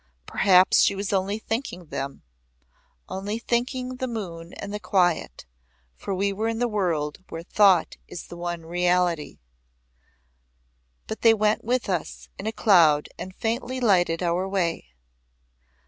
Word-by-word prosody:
Perhaps 185 Hz, -, +4 dB
she 200 Hz, -, +4 dB
was 200 Hz, +1 st, -3 dB
only 195 Hz, +2 st, 0 dB
thinking 220 Hz, -5 st, -4 dB
them 140 Hz, -2 st, -6 dB, 0.8 s
only 200 Hz, +3 st, -4 dB
thinking 250 Hz, +2 st, -2 dB
the 260 Hz, -, -2 dB
moon 175 Hz, -8 st, -6 dB
and 200 Hz, 0 st, -7 dB
the 210 Hz, -, -3 dB
quiet, 175 Hz, -, 0 dB, 0.5 s
for 195 Hz, -, -4 dB
we 200 Hz, +1 st, 0 dB
were 215 Hz, +3 st, -2 dB
in 225 Hz, 0 st, -1 dB
the 245 Hz, +1 st, +1 dB
world 175 Hz, -7 st, -1 dB
where 165 Hz, 0 st, -6 dB
thought 190 Hz, -2 st, +3 dB
is 175 Hz, -, -8 dB
the -, -, -10 dB
one 175 Hz, -1 st, -5 dB
reality. 175 Hz, -2 st, 0 dB, 1.7 s
But 220 Hz, -, -6 dB
they 225 Hz, -1 st, +6 dB
went 215 Hz, 0 st, +1 dB
with 245 Hz, +2 st, 0 dB
us 180 Hz, -4 st, -3 dB
in 200 Hz, -, -4 dB
a -, -, 0 dB
cloud 165 Hz, -10 st, +4 dB
and 185 Hz, +1 st, -7 dB
faintly 245 Hz, +3 st, -2 dB
lighted 180 Hz, -7 st, +2 dB
our 175 Hz, +2 st, 0 dB
way. 175 Hz, -, -1 dB
190 Hz, 145 wpm, -25 LUFS, 175-220 Hz, 1.7 s, they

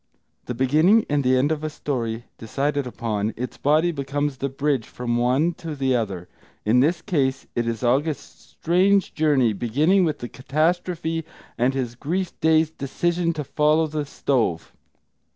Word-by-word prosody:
The 125 Hz, -, -4 dB
beginning 155 Hz, -, +4 dB
and 145 Hz, -1 st, +2 dB
the 130 Hz, 0 st, +3 dB
end 140 Hz, +4 st, +2 dB
of 155 Hz, -1 st, -2 dB
a 155 Hz, -, -1 dB
story 120 Hz, -6 st, -3 dB
decided 140 Hz, +4 st, -1 dB
upon, 110 Hz, -3 st, -2 dB
its 125 Hz, +2 st, -5 dB
body 155 Hz, +4 st, +2 dB
becomes 145 Hz, -1 st, -2 dB
the 140 Hz, +1 st, -2 dB
bridge 135 Hz, -3 st, -1 dB
from 120 Hz, -1 st, -3 dB
one 130 Hz, +8 st, +2 dB
to 160 Hz, -3 st, -5 dB
the 135 Hz, -2 st, +1 dB
other; 95 Hz, -7 st, -3 dB, 0.4 s
in 115 Hz, +4 st, +4 dB
this 165 Hz, +7 st, +2 dB
case 135 Hz, -8 st, 0 dB
it 120 Hz, -1 st, 0 dB
is 115 Hz, 0 st, -3 dB
August's 140 Hz, +5 st, -2 dB
strange 190 Hz, +4 st, +3 dB
journey, 140 Hz, -7 st, +2 dB
beginning 150 Hz, -, +2 dB
with 155 Hz, -3 st, 0 dB
the 120 Hz, -, -6 dB
catastrophe 165 Hz, +4 st, -1 dB, 0.3 s
and 125 Hz, +3 st, +1 dB
his 125 Hz, -3 st, -2 dB
grief 170 Hz, +9 st, -3 dB
dazed 160 Hz, 0 st, +2 dB
decision 170 Hz, +5 st, 0 dB
to 155 Hz, -2 st, -4 dB
follow 150 Hz, +3 st, +2 dB
the 150 Hz, -1 st, -3 dB
stove. 115 Hz, -, -1 dB
140 Hz, 160 wpm, -23 LUFS, 125-160 Hz, 0.4 s, beginning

